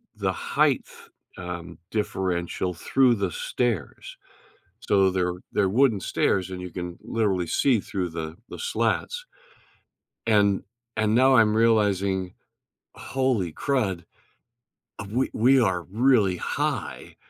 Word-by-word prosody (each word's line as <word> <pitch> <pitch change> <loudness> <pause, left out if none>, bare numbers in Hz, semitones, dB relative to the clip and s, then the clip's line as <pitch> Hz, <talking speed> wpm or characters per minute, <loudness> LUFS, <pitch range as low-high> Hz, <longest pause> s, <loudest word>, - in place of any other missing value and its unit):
the - - -1
heighth, - - -1 0.3
um, 85 -2 -7
differential 95 -4 -2
through 125 +8 +3
the - - -2
stairs, - - -3 0.6
so, 95 -1 +3
they're 90 -1 0 0.2
they're 100 - +2
wooden 115 -1 +3
stairs, 95 +1 0
and 90 -1 -6
you 90 - -6
can 90 0 -6
literally 95 -6 0
see 125 - +2
through 95 -4 -3
the 80 -1 -5
the - - -8
slats. 485 0 -1 1.0
And 100 -3 +3 0.3
and 110 0 +1
now 130 +2 +5
I'm 110 -2 +5
realizing, 100 -5 +2 0.6
"Holy 130 -10 -1
crud, 100 - -1 1.1
we 125 +5 0
we 130 +4 +4
are 95 -6 +1
really 110 -2 +2
high," - - -3
100 Hz, 115 wpm, -25 LUFS, 90-120 Hz, 1.1 s, now